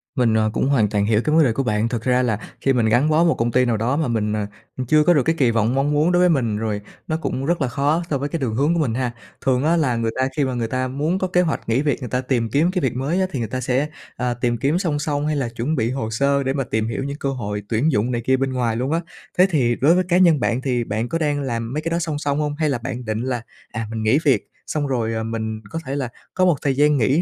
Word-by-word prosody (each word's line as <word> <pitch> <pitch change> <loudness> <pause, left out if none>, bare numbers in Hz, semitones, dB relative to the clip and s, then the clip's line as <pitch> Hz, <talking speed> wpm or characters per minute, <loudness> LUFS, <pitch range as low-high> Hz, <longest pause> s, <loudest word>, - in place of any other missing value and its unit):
Mình, 120 -5 +2
ờ, 110 -1 +2
cũng 130 - 0
hoàn 115 -7 +3
toàn 100 -1 +1
hiểu 110 +1 +2
cái 150 - +2
vấn 160 - +6
đề 120 -6 +2
của 135 - -1
bạn, 110 -1 0
thực 115 -2 -3
ra 125 0 +2
là 110 -4 0 0.2
khi 135 - +2
mình 120 -3 +2
gắn 125 +7 +3
bó 155 +2 +4
một 165 -2 +4
công 115 +1 0
ty 125 +2 +3
nào 120 -2 +1
đó 120 +5 0
mà 160 -3 0
mình, 110 -3 0
à, 105 -1 -2 0.4
chưa 155 +3 +5
có 175 - +5
được 145 -5 +3
cái 160 +4 +1
kỳ 125 -4 +4
vọng 115 +2 +1
mong 140 +2 +1
muốn 150 +4 +2
đối 175 - +3
với 180 0 +5
mình, 120 -9 +1
rồi 105 -1 -2 0.3
nó 155 - 0
cũng 135 -4 -3
rất 170 +1 0
là 135 - +2
khó 145 +7 0
so 140 - +1
với 140 +2 -3
cái 165 - -3
đường 120 -6 -2
hướng 145 +7 +2
của 170 - 0
mình 135 -8 0
ha. 125 0 -1 0.3
Thường 130 0 +2
á 160 +3 +3
là 135 -7 +1
người 115 -1 -1
ta 130 0 +2
khi 145 - +3
mà 130 - -2
người 120 -2 -1
ta 130 +2 -1
muốn 150 +8 -1
có 185 - 0
kế 180 0 +2
hoạch 165 -8 -2
nghỉ 115 +4 +2
việc, 145 -2 0
người 125 -4 -6
ta 125 +2 0
tìm 125 -3 -1
kiếm 155 - +2
cái 185 -1 -1
việc 130 -3 0
mới 140 +8 -1
á - - +3
thì 135 - -3
người 115 - -2
ta 130 +3 -4
sẽ, 130 +4 0 0.3
ờ, 125 -1 -1
tìm 120 0 -1
kiếm 145 +8 +1
song 160 -6 -1
song, 145 0 -1
hay 155 - 0
là 135 -4 -1
chuẩn 120 +7 -2
bị 115 -3 0
hồ 130 -4 -3
sơ 140 +4 +1
để 135 0 0
mà 135 -1 -1
tìm 110 -2 -1
hiểu 115 +4 -3
những 140 +1 -4
cơ 140 - -2
hội 105 -6 -4
tuyển 120 +8 +2
dụng 115 +1 +1
này 120 -1 -1
kia 130 0 +3
bên 135 0 -1
ngoài 120 -3 0
luôn 130 +5 -1
á. 165 - +2 0.4
Thế 185 +1 +6
thì 125 -8 +2
đối 145 +7 +4
với 185 - +2
cá 175 - +4
nhân 170 -5 +5
bạn 125 0 0
thì 125 -3 0
bạn 110 +2 -3
có 165 - 0
đang 145 -3 0
làm 115 -3 -3
mấy 150 - -1
cái 165 - -2
đó 170 +1 0
song 160 -3 -2
song 145 0 -1
hông? 150 -1 -1
Hay 155 0 0
là 135 - 0
bạn 125 0 -6
định 110 0 -2
là, 125 -1 -2 0.3
à, 115 -1 -4
mình 110 -1 -3
nghỉ 110 +7 +3
việc 130 -8 +2 0.2
xong 150 -2 -1
rồi, 115 -4 -1
à, 110 - -2
mình 110 -1 -4
có 165 - -4
thể 135 - -3
là 135 -4 -2 0.2
có 185 - +2
một 175 -3 +4
thời 135 -2 0
gian 150 +1 +4
nghỉ 135 +7 +2
130 Hz, 315 wpm, -21 LUFS, 115-150 Hz, 0.4 s, vấn